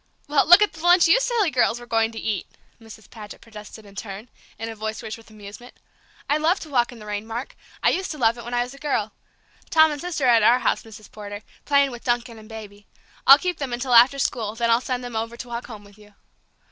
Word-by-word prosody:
"Well, 290 -1 +2
look 350 +5 +8
at 415 - -1
the 320 - -11
lunch 350 0 +5
you 370 +9 +5
silly 470 -8 0
girls 245 -2 +1
were 240 - -11
going 225 -1 0
to 225 - -7
eat!" 210 -4 -3 0.3
Mrs. 220 -1 -14
Paget 210 -2 -11
protested 215 -1 -12
in 200 - -15
turn, 200 +3 -8 0.3
in 225 +1 -5
a 225 - -6
voice 220 +1 -5
rich 220 -2 -5
with 225 -1 -17
amusement. 215 +3 -12 0.5
"I 295 - +2
love 325 +5 +1
to 310 - -10
walk 245 -2 +1
in 245 - -12
the 215 - -12
rain, 210 +1 -5
Mark; 235 +3 -6 0.3
I - - +4
used 375 +1 -2
to 305 - -6
love 230 -3 +2
it 235 - -10
when 240 +1 -5
I 240 - +2
was 245 +2 -9
a 275 - -14
girl. 220 -8 -1 0.6
Tom 315 -1 +5
and 290 - -5
Sister 335 -6 -2
are - - +4
at 230 -2 +5
our 235 +4 +5
house, - - 0
Mrs. 215 -2 -14
Potter, 205 0 -9 0.2
playing 280 -1 +3
with 240 -1 -10
Duncan 240 -1 -2
and 215 0 -15
Baby. 205 -2 -11 0.4
I'll 275 +1 +11
keep 360 +1 -3
them 270 -4 -4
until 245 +1 -2
after 245 +4 +7
school, 225 -5 -2
then 235 0 0
I'll 230 +1 +3
send 250 -1 -3
them 245 -2 -7
over 230 +1 -4
to 250 - -8
walk 235 0 -6
home 215 -4 -10
with 200 +1 -19
you." 210 -1 -19
235 Hz, 255 wpm, -23 LUFS, 220-275 Hz, 0.6 s, I'll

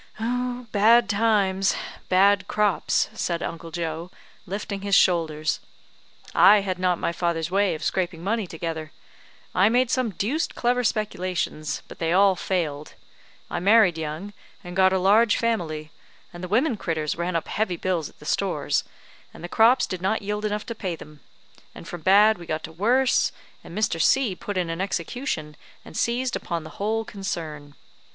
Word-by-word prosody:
"Bad 240 -1 +2
times 200 -3 +2 0.3
bad 195 +2 +4
crops," 210 -3 +1
said 170 -1 -2
Uncle 165 0 -6
Joe, 165 0 -4 0.4
lifting 200 +1 -4
his 200 0 +2
shoulders. 155 -3 +2 0.7
"I 205 0 +7
had 185 -2 -3
not 180 -1 +2
my - - -1
father's 170 -1 -2
way 195 -2 +2
of 155 - -8
scraping 175 -2 -2
money 215 0 -1
together. 160 -2 -5 0.6
I 190 +3 +4
made 250 +1 +2
some 255 -2 +1
deuced 230 - -2
clever 245 +1 +1
speculations, 185 - -2
but - - -12
they 165 0 0
all 195 0 +5
failed. 155 -6 -3 0.5
I - - -3
married 200 -1 +5
young, 160 +6 -5 0.3
and 175 -1 -8
got 190 0 +5
a 190 - +2
large 205 +4 +4
family; 160 -10 -2 0.4
and 175 +1 -9
the - - -3
women 235 - +1
critters 160 -5 -2
ran 170 +1 -2
up 165 - -1
heavy 205 -5 -1
bills 175 -5 -1
at - - -23
the - - -15
stores, - - 0 0.5
and - - -13
the - - -4
crops 230 +7 +4
did 185 -2 -5
not 200 +3 0
yield 210 +1 -3
enough 210 0 -2
to 230 - -5
pay 190 -6 -4
them; 150 -2 -13 0.6
and - - -10
from 175 - -7
bad 205 +3 +5
we 170 - -10
got 155 0 -3
to 160 - -7
worse, 245 +9 +2 0.3
and 170 - -9
Mr. 180 -6 0
C 240 0 +3
put 205 +1 -5
in 175 -2 -1
an 165 +2 -3
execution, 175 - -3 0.3
and - - -12
seized 245 +1 0
upon 170 -2 -3
the 155 - -10
whole 220 +2 0
concern. 155 -8 -6
190 Hz, 170 wpm, -24 LUFS, 165-215 Hz, 0.7 s, I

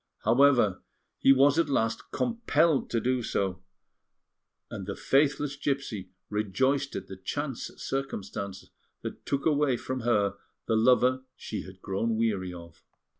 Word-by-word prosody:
However, 120 -4 +4 0.4
he 135 - +6
was 140 +3 +5
at 165 - +2
last 115 -4 0
compelled 170 - +1
to 115 - +1
do 125 +2 0
so; 95 -5 -1 1.1
and 95 - -6
the 100 - -3
faithless 145 0 +2
gipsy 135 -10 -3 0.2
rejoiced 130 +8 0
at 95 - -4
the 95 - -8
chance 135 +7 -4
circumstance 100 -7 -4 0.3
that - - -7
took 140 -1 -1
away 145 -5 +3
from 130 +2 -4
her 105 -4 +1 0.3
the 115 - +1
lover 125 +3 +4
she 110 - -5
had 95 0 -14
grown 110 +4 -1
weary 100 -5 0
of. 85 -2 -11
120 Hz, 135 wpm, -28 LUFS, 100-140 Hz, 1.1 s, he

